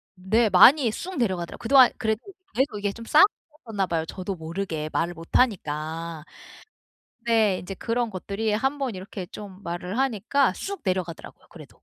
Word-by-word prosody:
네. 215 +5 +2
많이 245 +6 +7
쑥 365 +11 -6
내려가더라고요. 185 -8 -2
그동안 255 +1 +7
그래도 220 -1 0 0.3
계속 260 -5 0
이게 205 -1 -1
좀 230 +2 -10
쌓였었나 300 - +2
봐요, 165 -2 -1
저도 185 +3 -5
모르게. 160 -2 -4
말을 175 +1 -1
못 165 0 -11
하니까. 165 -7 -1 1.0
네. 220 -5 +3
이제 195 +2 -7
그런 230 +3 -2
것들이 205 +3 -3
한번 270 +1 -1
이렇게 190 0 -7
좀 200 0 -10
말을 180 +6 -4
하니까 265 -1 +1
쑥 400 0 -5
내려가더라고요. 185 -3 -4
그래도. - - -14
205 Hz, 350 characters per minute, -25 LUFS, 180-240 Hz, 1.0 s, 많이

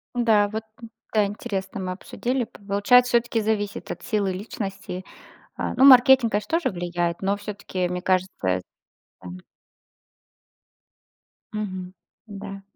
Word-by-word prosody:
Да 220 -4 +4
вот, 215 +1 -4 0.2
м, 230 - -8 0.2
да 215 -2 +4
интересно 200 -2 -4
мы 185 -1 -3
обсудили. 245 +6 -3
Получается 220 +3 +3
всё 235 - +5
таки 230 -1 -2
зависит 210 -1 -2
от 175 - -7
силы 210 -5 0
личности, 195 -2 -6 0.5
а. - - -3
Ну 260 - +4
маркетинг 260 -2 +7
конечно 265 +11 0
тоже - - 0
влияет, 175 0 -2
но 195 +1 +1
всё 205 +1 -6
таки 185 -2 -3
мне 180 0 -4
кажется. 185 - 0 0.6
Да. - - -7 2.3
Мгм. 185 -4 -5 0.3
Да. 200 -1 -8
205 Hz, 130 wpm, -24 LUFS, 185-225 Hz, 2.3 s, маркетинг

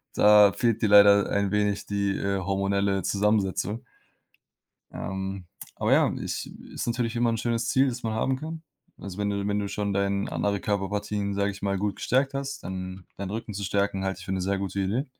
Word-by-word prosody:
da 105 -1 +7
fehlt 115 -2 +1
dir 110 - +2
leider 100 0 +7
ein 100 -1 0
wenig 105 -1 0
die, 100 -1 -1
äh, 100 0 -1
hormonelle 100 0 0
Zusammensetzung. 105 +1 0 1.1
Ähm, 95 -1 -5 0.3
aber - - +2
ja, - - +4
ich - - -4 0.2
ist - - -4
natürlich 120 0 -1
immer 120 0 +2
'n 115 - -1
schönes 115 0 -1
Ziel, 135 +2 +4
das 125 0 -6
man 110 -1 -1
haben 130 +4 0
kann. 160 +2 -7 0.4
Also, 100 -2 -8
wenn 105 0 0
du 100 0 -2
wenn 105 0 0
du 100 - -2
schon 100 -1 -2
deinen 100 0 0
andere 100 -1 -1
Körperpartien, 100 0 -2
sage 100 +1 0
ich 100 - -11
mal, 100 -1 0
gut 100 +1 -2
gestärkt 135 +2 +1
hast, 140 0 -4
dann 95 0 -6
deinen 100 0 -5
Rücken 110 -1 -5
zu 100 +1 -4
stärken, 100 0 0
halte 95 0 -2
ich 90 - -10
für 95 - -4
'ne 95 - -1
sehr 95 +2 0
gute 100 0 -3
Idee. 110 +9 -1
100 Hz, 200 wpm, -26 LUFS, 100-110 Hz, 1.1 s, da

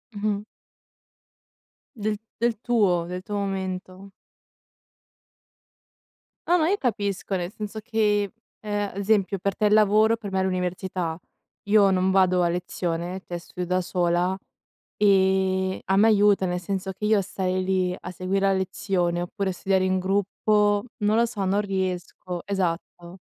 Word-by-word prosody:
Mh-mh. 205 0 -1 1.5
Del 210 -1 -2 0.2
del 235 -2 +1
tuo, 205 -8 +2
del 180 +1 -6
tuo 205 +1 -5
momento. 190 -1 -4 2.4
Ah 355 - +4
ma 320 -1 +2
io 405 - +2
capisco, 200 - -2
nel 175 0 -3
senso 215 0 -6
che, 210 -3 +1 0.3
ehm, 205 -1 -2
ad 195 - -12
esempio, 200 -1 +1
per 195 +1 -2
te 215 - 0
il 210 - +4
lavoro, 215 +1 +5
per 205 -3 -7
me 190 - +1
l'università. 180 -2 -2 0.4
Io 205 -1 +4
non 185 0 +2
vado 185 -1 +4
a 175 - +2
lezione, 175 +1 -3
cioè, 175 - -4
studio 180 +1 -6
da 185 +1 +1
sola 175 +1 +1 0.6
e 190 -2 +2
a 190 - +1
me 215 +3 +6
aiuta, 205 -3 +4
nel 180 0 -1
senso 190 +1 -3
che 210 - -5
io 215 -1 +4
a - - +1
stare 185 -1 -2
lì, 185 -1 0
a 180 - -7
seguir 185 +2 -2
la 195 0 +3
lezione 180 -2 -1
oppure 190 +2 -2
studiare 190 +1 +1
in 185 0 +1
gruppo, 205 +2 +1 0.2
non 210 +2 +3
lo 235 - +4
so, 220 -4 -3
non 200 +2 +2
riesco. 185 -2 -3
Esatto, 180 -1 -3
190 Hz, 150 wpm, -25 LUFS, 185-205 Hz, 2.4 s, me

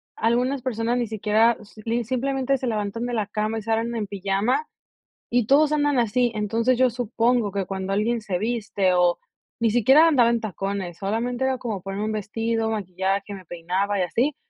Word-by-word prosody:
algunas 250 +4 +1
personas 235 -1 -1
ni 240 -1 -1
siquiera, 220 +2 +2
s 215 +1 -14
li 235 +1 0
simplemente 265 +2 0
se 255 - -4
levantan 215 +1 -2
de 245 - -3
la 215 -4 -1
cama 215 +1 -2
y 220 - -3
salen 225 +2 -1
en 215 -3 -2
pijama, 200 - 0 0.6
y 240 -2 +2
todos 295 +3 +4
andan 290 -2 +2
así. 240 +1 +2
Entonces, 225 +4 +1
yo 255 -1 +4
supongo 235 -2 0
que 200 -1 -1
cuando 190 +1 -4
alguien 225 +4 +1
se 195 -4 -2
viste 205 -3 0
o, 175 -1 +3 0.4
ni 230 -1 +3
siquiera 265 +9 +6
andaba 245 -6 +4
en 235 -1 +1
tacones, 195 -3 -4
solamente 235 +6 -2
era 265 -1 0
como 220 -6 -4
ponerme 195 +3 -4
un 220 - -2
vestido, 225 +2 -1
maquillaje, 195 0 -2
me 190 - -10
peinaba 185 +5 -2
y - - +3
así, 260 - 0
225 Hz, 185 wpm, -24 LUFS, 200-245 Hz, 0.6 s, siquiera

